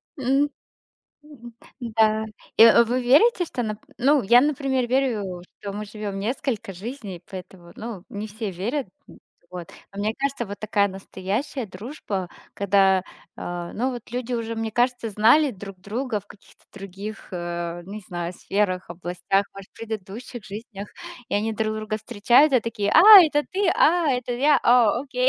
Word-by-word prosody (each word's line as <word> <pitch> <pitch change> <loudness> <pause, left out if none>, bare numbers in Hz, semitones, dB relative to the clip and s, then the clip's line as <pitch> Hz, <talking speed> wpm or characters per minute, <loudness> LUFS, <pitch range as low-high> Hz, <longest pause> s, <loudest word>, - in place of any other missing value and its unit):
М, 275 +2 +1 0.8
м, 240 -6 -13 0.3
да. 220 -2 +1 0.3
Э, 230 +1 +8
вы 245 +2 -1
верите, 355 - +4
что, 250 -6 -4
нап 215 -1 -4 0.2
ну 280 +2 +3
я, 235 +5 +6
например, 270 -3 0
верю, 220 -9 -1 0.2
что 200 -1 -5
мы 210 +1 -5
живём 205 -1 -6
несколько 225 -1 -3
жизней, 200 -2 -8
поэтому, 180 -2 -11
ну, 215 -5 -7
не 205 +1 -6
все 215 -1 -5
верят. 230 - -3 0.2
М, - - -15 0.3
вот. 175 -2 -8 0.3
Но 200 - -5
мне 215 +1 -1
кажется, 275 -3 -1
вот 200 +1 -7
такая 205 -1 +1
настоящая 195 +6 -4
дружба, 195 - -6 0.3
когда, 195 -2 +3 0.3
э, 175 -1 -5
ну, 255 +4 0
вот 240 -2 -9
люди 250 0 -3
уже, 230 -1 -3
мне 225 0 -3
кажется, 245 0 0
знали 235 +8 +4
друг 195 -3 -10
друга 220 +2 -3
в - - -28
каких-то 200 - -19
других, 195 +2 -8
э, 175 -1 -4
не 205 +3 -8
знаю, 175 -2 -5
сферах, 185 -1 -2
областях, 180 +3 -1
может, 195 -1 -11
предыдущих 220 +2 -7
жизнях. 205 0 -8 0.4
И - - -2
они 220 +2 0
друг 215 0 -1
друга 215 0 -3
встречают 240 +6 +3
и 255 - +5
такие: 210 -3 -2
"А, 335 - +7 0.2
это 295 -2 +1
ты? 395 +1 0
А, 335 -1 +4
это 250 -1 -1
я! 285 +5 +3
О, 240 -2 +4
окей!" - - 0
215 Hz, 160 wpm, -24 LUFS, 195-250 Hz, 0.8 s, Э